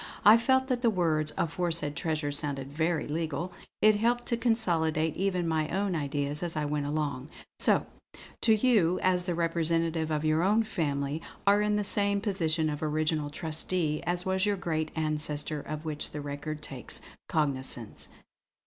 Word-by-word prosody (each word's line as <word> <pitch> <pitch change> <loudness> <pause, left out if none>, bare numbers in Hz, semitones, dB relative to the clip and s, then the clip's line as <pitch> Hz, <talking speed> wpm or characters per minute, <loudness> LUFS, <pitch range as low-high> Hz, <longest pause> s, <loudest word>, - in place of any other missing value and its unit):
I 210 +2 +10
felt 260 +3 +2
that 250 -2 0
the 235 - +4
words 160 -6 +1
'aforesaid 165 -3 0
treasure' 155 -2 -1
sounded 140 -1 -3
very 160 +1 0
legal; 160 +3 -3 0.3
it 215 -1 +6
helped 240 +3 +1
to 235 - +2
consolidate 165 -10 +1
even 185 -2 0
my 160 -1 0
own 195 +1 0
ideas 145 -1 -2
as 170 -2 -3
I 150 - 0
went 145 -1 -1
along. 145 -2 -2 0.3
"So, - - +4 0.6
too, 225 - +5
you 210 -7 +3
as 180 -1 +3
the 175 - 0
representative 165 -1 0
of 155 0 -1
your 155 +1 +3
own 210 +5 +3
family, 145 -6 -2 0.2
are 200 +1 +5
in 210 0 +1
the 210 - +1
same 200 0 +2
position 170 -6 0
of 150 -1 -3
original 155 -1 0
trustee 155 +1 -1
as 175 +1 -1
was 190 0 0
your 205 -1 +1
great 160 -4 -2
ancestor 150 -1 -1
of 155 +2 -6
which 150 -1 -3
this 150 - -6
record 145 +1 -5
takes 130 -5 -3 0.3
cognisance." 130 -6 -2
160 Hz, 165 wpm, -29 LUFS, 150-190 Hz, 0.6 s, I